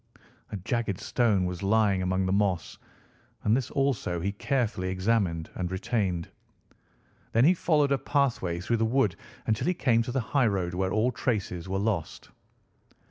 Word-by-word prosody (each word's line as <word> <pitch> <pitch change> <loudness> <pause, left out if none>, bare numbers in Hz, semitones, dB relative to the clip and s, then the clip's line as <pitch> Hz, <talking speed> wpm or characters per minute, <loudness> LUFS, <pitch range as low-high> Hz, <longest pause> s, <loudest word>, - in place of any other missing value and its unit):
A 105 - -3
jagged 100 0 -2
stone 105 -7 +1
was 90 -1 -4
lying 100 -1 +2
among 95 +1 0
the 95 - 0
moss, 95 -4 0 0.6
and 105 - +3
this 130 -2 -1
also 135 -11 0
he 95 +4 -1
carefully 110 -4 -1
examined 95 -4 0
and 90 -1 -3
retained. 95 -3 -1 1.1
Then 115 +3 +5
he 175 - +6
followed 155 -5 +2
a 140 - +2
pathway 120 - 0
through 115 +5 0
the 115 - +1
wood 110 -5 +2 0.3
until 110 +7 0
he 180 - +2
came 120 -7 +3
to 120 - -3
the 130 - 0
highroad, 105 -8 0
where 95 +1 -1
all 110 +5 +2
traces 100 -8 -2
were 95 - -1
lost. 95 -6 -2
105 Hz, 160 wpm, -28 LUFS, 95-120 Hz, 1.1 s, he